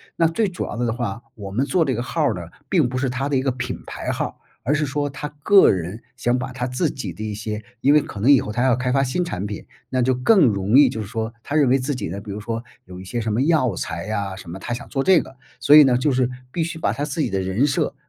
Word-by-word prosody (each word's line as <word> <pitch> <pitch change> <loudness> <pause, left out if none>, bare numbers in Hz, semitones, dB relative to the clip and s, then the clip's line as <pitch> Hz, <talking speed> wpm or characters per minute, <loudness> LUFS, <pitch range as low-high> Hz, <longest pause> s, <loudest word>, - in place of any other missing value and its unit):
那 165 - +3
最 205 +7 0
主 180 -2 -4
要 - - -6
的 120 -1 0
的 - - 0
话， 120 -1 -4
我 100 -3 -8
们 120 +7 0
做 165 +4 +2
这 130 - 0
个 120 - -2
号 155 +5 -1
儿 130 -6 +2
呢， 90 - -6 0.3
并 160 -10 +3
不 130 - -3
是 130 +1 0
他 130 +3 -2
的 135 - +1
一 - - +1
个 135 - +1
品 125 0 -5
牌 - - -4
号 - - -1
儿， - - -7 0.3
而 140 - +1
是 150 0 +1
说 145 +1 -2
他 150 +2 -6
个 200 -1 +7
人 95 +4 -4 0.2
想 125 0 +1
把 125 +1 -4
他 125 0 -3
自 125 +5 0
己 105 -10 -5
的 105 +6 -7
一 105 -1 -3
些 105 +1 -5 0.2
因 140 +2 +5
为 150 - +6
可 105 - -8
能 120 +8 +2
以 135 - +6
后 105 - -5
他 120 +3 0
要 130 -2 +4
开 125 0 -1
发 135 +1 +3
新 140 +8 0
产 100 - -4
品， 105 0 -7 0.2
那 130 -1 0
就 130 +2 +3
更 185 - +4
容 105 +3 +2
易 140 -3 +7
就 115 - -5
是 100 - -6
说 115 0 -4
他 145 - -4
认 145 -5 +4
为 135 - +4
自 130 +2 -2
己 105 -7 -4
呢， 100 +4 -5
比 100 0 -8
如 105 - -5
说 115 +1 -3 0.2
有 90 -1 -10
一 95 - -10
些 115 +5 -3
什 110 -1 -2
么 115 - +1
药 140 - +2
材 85 +5 -4
啊， 100 -3 -2
什 95 -2 -11
么 95 +3 -7
他 120 - -4
想 120 - -6
做 135 - -1
这 185 -1 +5
个。 135 - -13 0.2
所 145 - +6
以 150 - +11
呢， 125 -2 +3
就 140 +4 +1
是 130 -1 +1 0.2
必 170 - -1
须 165 0 -4
把 - - +1
他 145 - -2
自 150 +2 -3
己 130 - 0
的 95 -2 -1
人 95 +9 +1
设 140 - -1
125 Hz, 330 characters per minute, -22 LUFS, 105-145 Hz, 0.3 s, 以